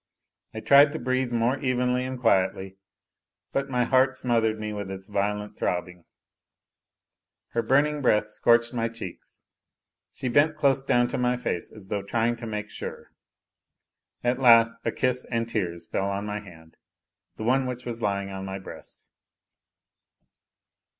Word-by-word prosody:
I 110 - -4
tried 140 +3 +6
to - - -3
breathe 130 -1 -1
more 120 +3 +1
evenly 125 -1 0
and 130 -1 -5
quietly, 95 -4 +1 0.8
but 135 0 -1
my 125 -2 +1
heart 130 +2 +3
smothered 115 -3 +1
me 105 0 -4
with 100 -2 -5
its 95 0 -7
violent 105 +1 -2
throb 90 -1 0
bing. 90 -1 -15 1.4
Her 115 - 0
burning 145 +4 +2
breath 105 -5 +3
scorched 120 +2 +3
my 115 -1 -1
cheeks; 115 0 -10 0.7
she 130 - -5
bent 145 +5 +3
close 140 -2 +3
down 120 -2 +2
to 125 - -3
my 125 0 +1
face 90 -8 -3
as 100 -3 -14
though 100 -1 -1
trying 115 +4 0
to 120 -1 -7
make 105 -1 -5
sure. - - -8 1.1
At 120 +1 +1
last 115 -2 +6
a - - 0
kiss 125 0 +1
and 115 -1 -2
tears 85 -7 -3
fell 95 +3 -2
on 100 +1 -3
my 105 0 -3
hand, 80 -5 -15 0.6
the - - -5
one 130 +3 +2
which 125 0 -6
was 120 -1 -5
lying 100 -1 -1
on 95 0 -6
my 95 0 -5
breast. 95 - -11
115 Hz, 155 wpm, -26 LUFS, 100-125 Hz, 1.4 s, tried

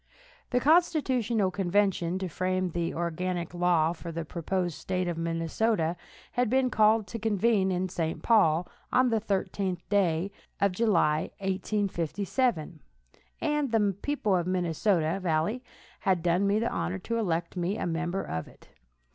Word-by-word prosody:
The 250 - +2
constitutional 260 - +2
convention 185 -2 +1
to 190 0 -3
frame 185 +1 -1
the 170 0 -1
organic 175 +1 -3
law 175 -2 +2
for 170 0 -8
the 165 0 -4
proposed 175 +1 -2
State 185 -1 -2
of 175 - -1
Minnesota 165 +2 0 0.4
had 245 -2 +1
been 260 +1 +2
called 215 0 +4
to 230 +4 -6
convene 210 -2 +2
in 185 +1 0
St. 165 -3 -3
Paul, 180 -7 +4 0.2
on 255 0 +4
the 225 -1 +2
thirteenth 195 -3 -2
day 190 -2 +1 0.3
of 200 -1 +3
July, 180 -7 +2
1857, 195 - -1 0.6
and 295 -4 0
the 205 -4 +2
people 275 -9 0
of 175 -2 0
the 185 - -1
Minnesota 175 0 +1
valley 170 +7 0 0.4
had 185 -5 +1
done 180 +3 +2
me 200 +1 +3
the 230 +2 0
honor 185 - -2
to 230 +5 -3
elect 170 -5 -1
me 180 +4 -1
a - - -2
member 175 +3 -2
of 80 -1 -4
it. - - -18
185 Hz, 150 wpm, -28 LUFS, 170-215 Hz, 0.6 s, called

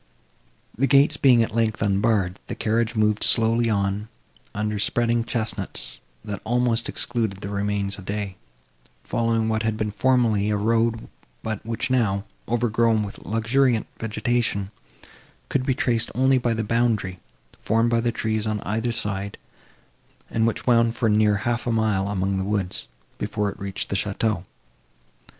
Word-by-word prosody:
The 135 +5 +2
gates 140 +3 +5
being 130 -5 +5
at 110 - -4
length 110 -2 +1
unbarred, 100 -2 +1
the - - -4
carriage 115 +1 0
moved 105 -1 +2
slowly 115 0 +4
on, 100 0 0 0.5
under 105 0 -1
spreading 120 +2 +1
chesnuts, 115 -1 -1 0.3
that 100 -2 -5
almost 120 0 +1
excluded 110 -5 -2
the 100 - -5
remains 100 0 -1
of 95 - -11
day, 100 -1 -3 0.7
following 115 -1 0
what 110 0 0
had 110 -1 -1
been 105 -1 -2
formerly 115 -4 +2
a 105 - +1
road, 115 +2 +1 0.4
but 110 -2 -4
which 115 +3 -3
now, 105 -5 +1 0.2
overgrown 115 -1 +2
with 100 - -7
luxuriant 115 +2 +1
vegetation, 115 -3 -1 0.8
could 130 -2 0
be 130 - +2
traced 115 -3 0
only 130 +1 +4
by 120 -2 0
the 110 - -1
boundary, 110 -5 0 0.4
formed 115 +1 +1
by 115 0 +2
trees, 110 -1 -1
on 110 -1 -1
either 110 +3 -1
side, 100 -2 -3 0.9
and 115 0 +2
which 115 - -2
wound 115 -2 +3
for 115 - +1
near 105 0 +4
half 120 +1 -1
a - - +2
mile 110 -4 +1
among 95 -1 -1
the 95 - -1
woods, 100 -2 -1 0.3
before 105 -1 -1
it - - -14
reached 100 0 -4
the - - -1
château. 100 -1 -1
110 Hz, 150 wpm, -24 LUFS, 105-115 Hz, 0.9 s, gates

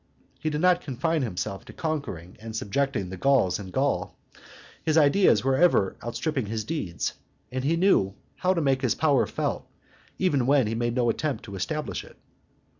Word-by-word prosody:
He 155 - -1
did 150 0 -2
not 180 0 +4
confine 150 +4 -1
himself 95 -4 -3
to - - -11
conquering 140 - -4
and 110 0 -7
subjecting 110 -2 -1
the 95 - -6
Gauls 115 -6 +3
in 100 - -7
Gaul; 130 -5 -1 0.7
his 155 0 +2
ideas 145 - +5
were 135 0 +2
ever 150 - +3
outstripping 130 +1 -2
his 110 +1 -2
deeds, 100 - -3 0.4
and 130 0 -3
he 160 +4 +2
knew 165 - +3 0.2
how 185 +1 +2
to 170 - +1
make 135 -3 +2
his 125 -5 +1
power 145 -5 +3
felt - - -3 0.5
even 145 -9 +1
where 140 -1 +5
he 105 - -2
had 115 +1 -2
made 120 0 0
no 125 -2 +2
attempt 140 -3 -3
to 100 -3 -8
establish 150 +11 -3
it. - - -16
130 Hz, 185 wpm, -26 LUFS, 105-155 Hz, 0.7 s, ideas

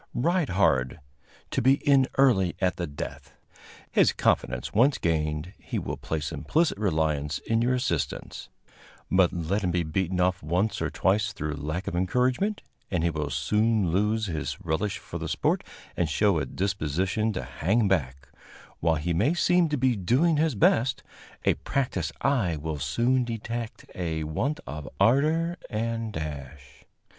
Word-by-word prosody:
Ride 170 +3 +1
hard, 80 -7 +2 0.5
to - - 0
be 130 +3 +5
in 140 -2 +3
early 105 -10 +4
at 95 -1 +1
the 85 - -2
death. 70 -1 -7 0.6
His - - +4
confidence 60 0 0
once 130 +6 +4
gained, 80 +1 -1
he - - -5
will - - -3
place 75 -2 -3
implicit 160 -8 0
reliance 80 -7 0
in 115 0 0
your 125 +2 +2
assistance; 85 - -3 0.6
but, 95 -2 +4
let 90 +5 -1
him 90 - +1
be 90 0 +1
beaten 90 +3 -1
off 90 0 +2
once 95 +7 0
or - - 0
twice 100 +2 +1
through 80 -6 -3
lack 75 +5 -4
of - - -3
encouragement, 125 - +1 0.3
and 90 -4 0
he 85 - +2
will 75 -2 -3
soon 105 -4 +1
lose 105 +4 +1
his 80 -5 -3
relish 95 +6 -1
for - - -7
the - - -4
sport - - 0 0.3
and 85 -3 0
show 100 +2 +2
a - - -3
disposition 95 +3 -1
to - - -3
hang 105 +7 +1
back; 70 -7 -1 0.5
while 80 0 +2
he 80 +3 -1
may 110 - +2
seem 175 -1 +3
to 150 - 0
be 130 -1 +2
doing 130 - +2
his 155 -3 +1
best, 120 +5 +2 0.4
a - - +5
practiced 95 - -2
eye 115 - +1
will 75 0 -4
soon 120 - +1
detect 115 -1 -5
a 80 -3 -2
want 115 - -2
of 75 0 -6
ardor 155 - +3
and 115 0 -2
dash. 70 -4 -7
95 Hz, 160 wpm, -27 LUFS, 80-120 Hz, 0.6 s, be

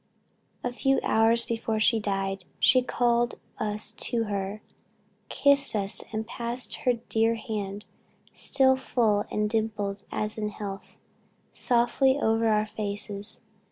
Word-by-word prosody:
"A 245 - -2
few 270 +2 +2
hours 225 +1 +3
before 225 -1 -2
she 225 +1 +4
died, 195 -2 -2
she 255 - +5
called 240 -1 +1 0.2
us 215 0 -2
to 230 +1 +1
her, 200 0 -4 0.7
kissed 280 -3 +3
us, 200 -1 0
and 220 0 -3
passed 235 +2 -2
her 250 - +2
dear 225 -1 +1
hand, 210 -2 -5 0.5
still 265 -1 +3
full 225 -5 +1
and 210 0 0
dimpled 210 -2 -2
as 215 +1 -2
in 210 -1 -1
health, 200 -2 -8 0.6
softly 250 +2 +2
over 225 -2 +2
our 215 -1 +3
faces. 205 -1 -4
220 Hz, 125 wpm, -27 LUFS, 210-235 Hz, 0.7 s, she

